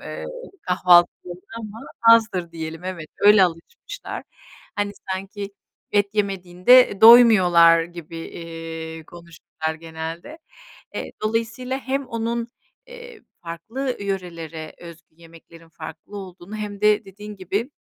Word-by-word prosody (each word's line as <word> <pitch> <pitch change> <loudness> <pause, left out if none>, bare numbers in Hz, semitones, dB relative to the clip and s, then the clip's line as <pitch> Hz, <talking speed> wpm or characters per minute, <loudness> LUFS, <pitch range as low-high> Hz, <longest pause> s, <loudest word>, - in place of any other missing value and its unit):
eee, - - -7 0.4
kahvaltıları 180 0 +3 0.2
ama 215 0 -8 0.2
azdır 220 -7 +4
diyelim 165 +1 -7
evet, 170 -4 -6
öyle 205 -1 +7
alışmışlar. 470 - -6 0.5
Hani, 205 0 -1 0.2
sanki 200 +1 -6 0.4
et 205 -1 +3
yemediğinde, 195 +4 +4
e, 200 - -8
doymuyorlar 185 -8 +8
gibi, 170 -1 -10
iii, 165 -1 -8
konuşurlar 160 -2 -7
genelde. 165 - -8 0.6
E, - - -3 0.2
dolayısıyla 230 +4 -2
hem 270 0 -3
onun, 230 +1 -3 0.4
eee, 485 -2 -12 0.2
farklı 225 - -4
yörelere 170 -5 -5
özgü 165 -2 -14
yemeklerin 165 0 -16
farklı 160 +5 -10
olduğunu 190 +2 -9
hem 205 -1 -6
de 210 0 +3
dediğin 205 +2 -10
gibi 200 - -3
185 Hz, 110 wpm, -22 LUFS, 165-220 Hz, 0.6 s, doymuyorlar